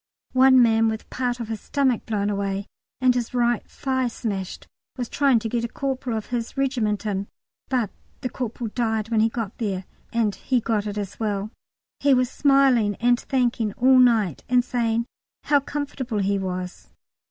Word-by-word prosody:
One 260 -1 +7
man 225 -1 +4
with 220 0 -3
part 245 -1 -1
of 235 - -4
his 220 -1 -5
stomach 265 -5 0
blown 210 -2 0
away 200 0 -2 0.3
and 255 -1 +4
his 245 0 -3
right 240 -1 +2
thigh 260 -2 -1
smashed 200 -5 -4 0.3
was 245 -2 -2
trying 275 -2 +3
to 225 0 -2
get 235 +1 -1
a - - 0
corporal 260 -2 -3
of 215 - -4
his 235 +2 -3
regiment 235 -6 0
in, 200 -1 -2 0.4
but 245 -7 0 0.3
the 255 - -2
corporal 235 -2 -4
died 225 -2 -1
when 225 -2 +2
he 220 +1 +4
got 225 -3 -4
there, 195 -5 -2 0.3
and 225 -3 +1
he 255 +4 0
got 215 -2 -1
it 205 0 -4
as 205 -1 -5
well. 210 -1 -2 0.5
He 280 -1 +4
was 250 0 +1
smiling 270 -7 +4
and 245 +2 +2
thanking 240 -5 0
all 260 +3 +5
night, 225 - +3
and 250 0 +3
saying 235 -2 0 0.4
how 290 -1 +4
comfortable 275 -4 -4
he 200 0 +1
was. 185 -1 -5
230 Hz, 175 wpm, -24 LUFS, 210-255 Hz, 0.5 s, One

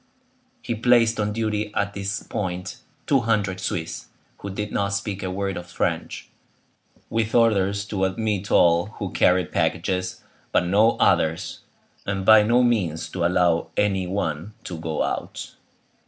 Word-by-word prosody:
He - - -2
placed 115 0 +3
on 105 0 0
duty 105 -1 -2
at 100 -1 0
this 100 +1 -3
point 90 -1 -4 0.3
two 140 - +3
hundred 105 -5 0
Swiss, 80 -3 -4 0.3
who 100 - -6
did 105 +2 -4
not 100 0 -1
speak 100 -1 -3
a 95 - -3
word 95 +1 -2
of 85 0 -7
French, - - -3 0.8
with 115 -1 0
orders 100 -4 +3
to 95 -2 -1
admit 100 0 -2
all 85 +2 +4
who 100 -3 -4
carried 90 -1 +2
packages, 90 0 -1 0.3
but - - +2
no 105 +6 +4
others; 80 +1 +1 0.4
and 100 -1 -3
by 110 0 +8
no 120 +4 +3
means 95 -10 0
to 90 - -3
allow 85 -1 +2
any 95 -3 +1
one 90 0 -3
to 85 -3 -6
go 80 -1 -2
out. - - -4
100 Hz, 150 wpm, -23 LUFS, 90-110 Hz, 0.8 s, by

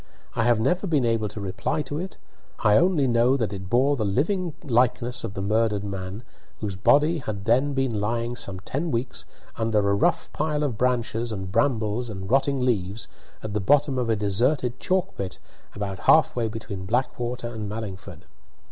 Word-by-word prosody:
I 115 - +1
have 120 -2 +4
never 175 - +1
been 150 -7 +2
able 115 -2 +1
to 105 - -7
reply 95 - -2
to 145 +1 -4
it. 185 +2 -6 0.5
I 105 -1 +5
only 170 -1 +4
know 120 +2 +3
that 110 -5 -1
it 95 -2 -7
bore 135 +6 +3
the 115 - -1
living 160 - 0
likeness 120 -1 +1
of 100 - -5
the 95 - -3
murdered 105 0 +1
man, 100 +2 -5 0.4
whose 100 -3 -3
body 150 - +4
had 105 -7 -5
then 130 +5 +2
been 130 -6 0
lying 115 +3 -1
some 95 -5 -2
ten 145 - -3
weeks 120 -1 -2 0.3
under 115 -1 +1
a 100 - +3
rough 100 - +1
pile 150 0 0
of 135 -6 -1
branches 120 -1 0
and 95 -3 -5
brambles 115 -1 +1
and 95 -1 -6
rotting 135 0 +3
leaves, 105 -2 -1 0.4
at 110 -1 -4
the 105 - 0
bottom 140 +5 +3
of 120 -2 -1
a 110 - +3
deserted 120 +5 0
chalk 190 0 0
pit 95 -1 -4 0.4
about 100 -2 -4
half 160 - +5
way 120 -2 0
between 105 -4 -6
Blackwater 120 +1 -1
and 110 -3 -5
Mallingford. 105 -4 -7
115 Hz, 185 wpm, -25 LUFS, 105-135 Hz, 0.5 s, I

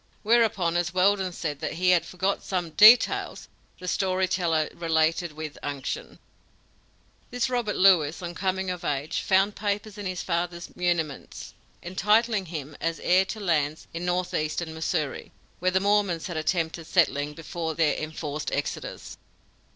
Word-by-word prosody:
Whereupon, 210 -7 +2
as 175 +1 -1
Weldon 190 0 +3
said 150 -4 -4
that 155 - -3
he 180 +2 +2
had 175 -2 +3
forgot 190 +2 -1
some 175 -4 -3
details, 215 +9 +5 0.3
the 180 - -9
story 185 0 +1
teller 165 -4 +1
related 165 +1 +1
with 155 -1 -7
unction: 140 -2 -5 1.1
"This 245 +1 -1
Robert 235 -5 -1
Lewis, 170 -5 +4
on 175 0 -5
coming 190 +1 -1
of 180 -1 -6
age, 145 +1 -2
found 195 +2 +2
papers 210 0 -3
in 200 - -4
his 185 -1 -4
father's 170 0 -3
muniments, 170 -5 -2 0.3
entitling 210 +3 +1
him 155 -3 -6
as 165 0 -1
heir 185 +2 +4
to 215 - -6
lands 155 -6 0
in 170 +1 -5
northeastern 175 -2 -1
Missouri, 160 -2 -3 0.3
where 185 - +2
the 185 +1 +2
Mormons 200 -4 +1
had 175 - -5
attempted 160 0 -1
settling 150 -4 +1
before 165 +1 -5
their 160 -2 +2
enforced 155 -1 -4
exodus. - - -4
175 Hz, 145 wpm, -26 LUFS, 160-190 Hz, 1.1 s, details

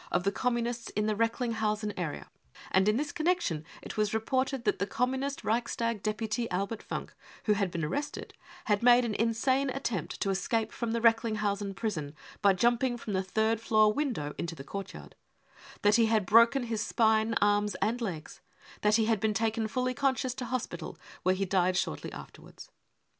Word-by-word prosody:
of 180 - +1
the 200 - +1
Communists 240 0 -1
in 210 +1 +1
the 215 - +1
Recklingshausen 220 -2 -1
area, 165 -5 -5 0.4
and 190 +2 +4
in 215 - +2
this 290 +1 -2
connection 310 - 0 0.2
it - - -8
was 215 0 +1
reported 260 +3 0
that - - +1
the 200 - 0
^Communist 265 +5 -1
Reicfistag 230 -1 -1
deputy 220 +2 -2
Albert 200 +4 -2
Funk, - - -6 0.3
who 210 - +3
had 200 -2 0
been 170 -2 -3
arrested, 285 - -4 0.3
had 205 -1 +2
made 245 0 +6
an 225 - -2
insane 255 +5 +1
attempt 240 - -3
to 195 - +1
escape 215 +4 -1
from 235 -2 -3
the 230 - -1
Recklinghausen 215 -3 +1
prison 160 -10 -3 0.3
by 200 -2 +6
jumping 240 +5 +2
from 215 -3 -5
the 190 - +1
third 220 +4 0
floor 215 -1 +4
window 235 - -2
into 165 -1 -3
the 135 - -9
courtyard; 195 +6 -8 0.7
that 205 +2 +5
he 230 -1 +4
had 220 -3 +2
broken 230 +6 +5
his 225 -2 -2
spine, 220 0 +2
arms 205 0 +2
and 235 +3 -1
legs; 175 -9 -5 0.4
that 210 0 +4
he 225 -1 +3
had 220 -2 +2
been 215 0 0
taken 225 0 0
fully 255 +3 -1
conscious 260 -2 0
to 255 0 -5
hospital, 255 +1 -4 0.2
where 185 0 +2
he 195 +1 -1
died 185 -1 +2
shortly 75 - -2
afterwards. - - -12
220 Hz, 180 wpm, -30 LUFS, 200-240 Hz, 0.7 s, made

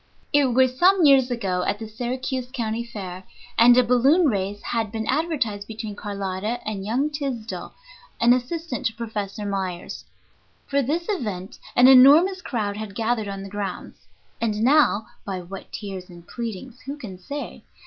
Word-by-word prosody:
It 290 -1 +5
was 255 +1 +2
some 370 -1 +5
years 270 -3 +6
ago, 195 -7 -1
at - - 0
the 220 +1 -7
Syracuse 250 +3 -3
County 230 -3 -2
Fair, 190 -6 -7 0.3
and 240 +1 +7
a 250 - +7
balloon 265 +9 +4
race 200 -1 -2
had 225 -3 -2
been 220 0 -3
advertised 260 -8 -1
between 220 -2 -6
Carlotta 200 +2 -3
and 205 -3 -3
young 255 +9 0
Tysdell, 270 -6 -5 0.5
an 235 +1 +6
assistant 255 0 -2
of 220 - -17
Professor 210 -3 -4
Myers. 190 -3 -4 0.6
For 280 0 +1
this 310 +7 -1
event 210 - -4 0.2
an 245 +1 +7
enormous 295 +9 +7
crowd 210 - -2
had 210 -2 -6
gathered 225 -1 0
on 195 -1 -5
the 195 - -8
grounds. 205 0 -6 0.3
And 215 -1 0
now 260 -5 +4 0.2
(by 190 -2 -4
what 185 +2 -9
tears 195 -3 -7
and 175 -1 -14
pleadings 235 +1 -6
who 280 +2 -4
can 195 -10 -9
say?) 285 +10 -7
230 Hz, 160 wpm, -24 LUFS, 205-260 Hz, 0.6 s, and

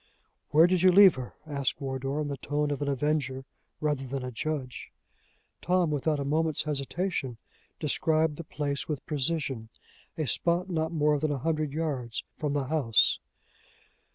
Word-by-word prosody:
"Where 155 +3 +7
did 180 0 +2
you 185 0 +7
leave 190 -1 +8
her?" 130 -2 -7
asked 140 -3 -2
Wardour, 135 +1 -3
in 150 - -2
the 140 -1 -4
tone 145 +1 -1
of 145 - -3
an 145 - -1
avenger 140 -1 -1 0.3
rather 150 -3 0
than 135 0 -4
a 125 - -4
judge. 130 +1 -4 0.7
Tom, 180 -3 +2
without 150 +1 0
a 140 - -2
moment's 155 +1 +1
hesitation, 145 -2 -2 0.4
described 155 0 +1
the 170 - -6
place 145 -2 -3
with 150 -4 -4
precision 135 -6 -2 0.5
a 155 - 0
spot 175 +6 0
not 160 -1 0
more 150 -2 +2
than 155 +1 0
a 145 - 0
hundred 155 +1 -1
yards 140 -7 -3 0.2
from 150 -3 -1
the 145 -1 0
house. 130 -6 +3
150 Hz, 160 wpm, -28 LUFS, 135-160 Hz, 0.7 s, leave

